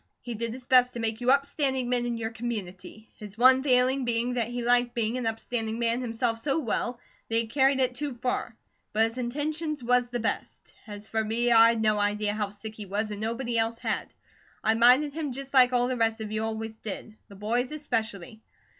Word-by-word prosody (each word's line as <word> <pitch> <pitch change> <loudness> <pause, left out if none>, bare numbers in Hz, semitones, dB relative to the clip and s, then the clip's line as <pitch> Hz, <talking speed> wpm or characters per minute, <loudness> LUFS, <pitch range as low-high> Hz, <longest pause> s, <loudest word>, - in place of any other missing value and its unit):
He 240 - -6
did 230 +1 -3
his 250 +1 -9
best 250 -1 +4
to 240 - -6
make 225 0 -2
you 245 - +1
upstanding 275 -2 +2
men 245 -1 +1
in 235 -1 -2
your 225 0 -3
community, 220 -3 -6
his 210 0 -9
one 260 +2 +6
failing 260 0 +3
being 240 +1 0
that 235 -3 0
he 240 0 -4
liked 245 0 +2
being 230 0 0
an 240 - -2
upstanding 225 0 -2
man 235 +1 +1
himself 230 -1 -1
so 275 +4 -1
well 240 -3 -2 0.3
that 225 - -1
he 230 0 +2
carried 270 +3 +2
it 255 -1 +2
too 280 0 -4
far; 250 +1 -3 0.4
but 225 +1 +3
his 235 +3 -9
intentions 300 +3 -3
was 245 0 +2
the 245 0 -3
best. 225 - -4
As 205 0 -9
for 220 0 -1
me, 235 +3 +1
I'd 230 -1 +6
no 215 -1 +2
idea 205 0 0
how 210 -1 -2
sick 210 +2 -9
he 210 -2 -9
was, 210 +3 -2
and 205 0 -6
nobody 235 +1 -1
else 225 +1 +1
did. - - -2 0.6
I 220 - +3
minded 250 +6 +5
him 300 -4 -3
just 275 +1 -8
like 255 -2 +6
all 245 -1 +2
the 255 - -1
rest 225 -1 +1
of 215 -1 -6
you 215 0 -1
always 225 0 -4
did; 215 0 -7
the 200 - -13
BOYS 235 +6 -1
especially. 225 - -4
235 Hz, 215 wpm, -27 LUFS, 220-250 Hz, 0.6 s, one